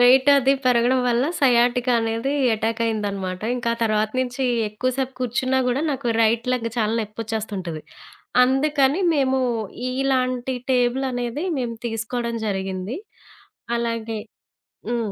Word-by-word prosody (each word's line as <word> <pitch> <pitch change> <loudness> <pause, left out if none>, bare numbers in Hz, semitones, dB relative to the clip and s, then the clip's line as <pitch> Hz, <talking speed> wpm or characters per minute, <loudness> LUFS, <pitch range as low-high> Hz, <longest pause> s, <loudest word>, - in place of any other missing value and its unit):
వెయిటది 265 +2 +6
పెరగడం 250 +1 +3
వల్ల 240 +2 +2 0.2
సయాటికా 245 -1 +3
అనేది 225 +4 -1 0.2
అటాక్ 225 +1 -2
అయిందనమాట. 200 -4 -2 0.2
ఇంకా 235 -1 -1
తర్వాత 215 -1 +1
నుంచి 255 +1 -2 0.2
ఎక్కువ 235 +5 -1
సేపు 265 -1 -2
కూర్చున్నా 255 +2 0
గూడా 250 +3 +1
నాకు 275 -3 -3 0.2
రైట్ 230 +2 +2
లెగ్ 230 -2 -1
చాలా 215 -1 +1
నొప్పొచ్చేస్తుంటది. 210 -6 -4 0.6
అందుకని 275 +4 +2
మేము 265 -2 +2 0.5
ఇ-ఇలాంటి 255 -1 0 0.2
టేబులనేది 250 +2 0
మేము 240 -2 -2
తీసుకోడం 235 +1 -3
జరిగింది. 190 +2 -3 0.8
అలాగే 230 -1 -2 0.7
హ్మ్. 235 -3 -1
240 Hz, 110 wpm, -23 LUFS, 225-260 Hz, 0.8 s, వెయిటది